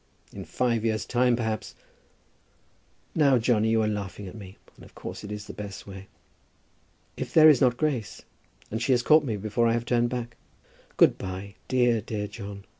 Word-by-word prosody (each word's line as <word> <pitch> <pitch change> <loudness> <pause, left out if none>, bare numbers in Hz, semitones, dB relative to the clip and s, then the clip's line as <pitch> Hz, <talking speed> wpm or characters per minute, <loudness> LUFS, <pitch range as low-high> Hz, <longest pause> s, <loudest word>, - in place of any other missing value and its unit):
In - - -8
five 120 -3 0
years 110 -1 -1
time 125 0 +2
perhaps, 110 -2 -3 0.6
" - - -39
"Now, 140 -4 +4
Johnny, 110 -2 +2
you 110 0 +2
are - - +1
laughing 100 -1 -4
at 90 - -9
me. 100 -3 -11 0.2
And - - -16
of - - -17
course - - -8
it 105 - -7
is 105 0 -6
the - - -9
best 100 -2 -8
way. 95 -1 -10 1.1
If - - -5
there 155 0 +9
is 145 -5 +4
not 125 -2 +3
Grace, 130 -10 -2 0.5
and 110 +2 -3
she 130 - +2
has 120 -1 +1
caught 155 +3 +5
me 115 -7 -2
before 110 +3 0
I 115 - +2
have 120 0 -1
turned 120 0 +1
back. 120 -1 -5 0.6
Good - - +5
by, 95 +1 -6
dear, 120 -3 +2
dear 105 -1 -4
John. 100 -1 -9
115 Hz, 190 wpm, -26 LUFS, 105-120 Hz, 1.1 s, there